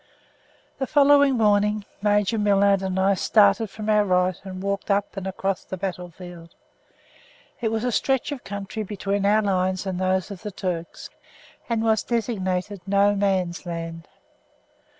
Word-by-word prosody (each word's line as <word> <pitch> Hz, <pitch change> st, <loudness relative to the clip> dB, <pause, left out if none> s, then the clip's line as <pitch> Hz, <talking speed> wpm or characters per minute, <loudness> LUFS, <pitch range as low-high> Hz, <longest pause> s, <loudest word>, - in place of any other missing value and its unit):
The 265 Hz, -, -1 dB
following 285 Hz, -2 st, +5 dB
morning 210 Hz, -1 st, +2 dB, 0.2 s
Major 210 Hz, +1 st, +2 dB
Millard 200 Hz, -1 st, +3 dB
and 190 Hz, -1 st, -2 dB
I 195 Hz, +1 st, +3 dB
started 205 Hz, +2 st, +3 dB
from 215 Hz, +1 st, -7 dB
our 210 Hz, -1 st, +4 dB
right 180 Hz, -1 st, +2 dB
and 190 Hz, -1 st, -7 dB
walked 200 Hz, +1 st, -3 dB
up 200 Hz, 0 st, 0 dB
and 195 Hz, -1 st, -5 dB
across 195 Hz, 0 st, -2 dB
the 190 Hz, -, -6 dB
battle 180 Hz, -1 st, -4 dB
field. 170 Hz, -1 st, -12 dB, 1.1 s
It 225 Hz, -, +1 dB
was 225 Hz, 0 st, -1 dB
a 250 Hz, -, 0 dB
stretch 265 Hz, +4 st, 0 dB
of 280 Hz, -3 st, -6 dB
country 200 Hz, +2 st, -5 dB
between 200 Hz, -1 st, -2 dB
our 215 Hz, +1 st, +3 dB
lines 185 Hz, -1 st, 0 dB
and 185 Hz, -2 st, -3 dB
those 185 Hz, +1 st, 0 dB
of 190 Hz, -3 st, -8 dB
the 210 Hz, -, -5 dB
Turks, 180 Hz, -4 st, -5 dB, 0.6 s
and 230 Hz, -1 st, 0 dB
was 220 Hz, -1 st, +2 dB
designated 200 Hz, -5 st, -2 dB
No 200 Hz, +1 st, +3 dB
Man's 190 Hz, -4 st, -1 dB
Land. 165 Hz, -1 st, -6 dB
200 Hz, 155 wpm, -24 LUFS, 185-215 Hz, 1.1 s, following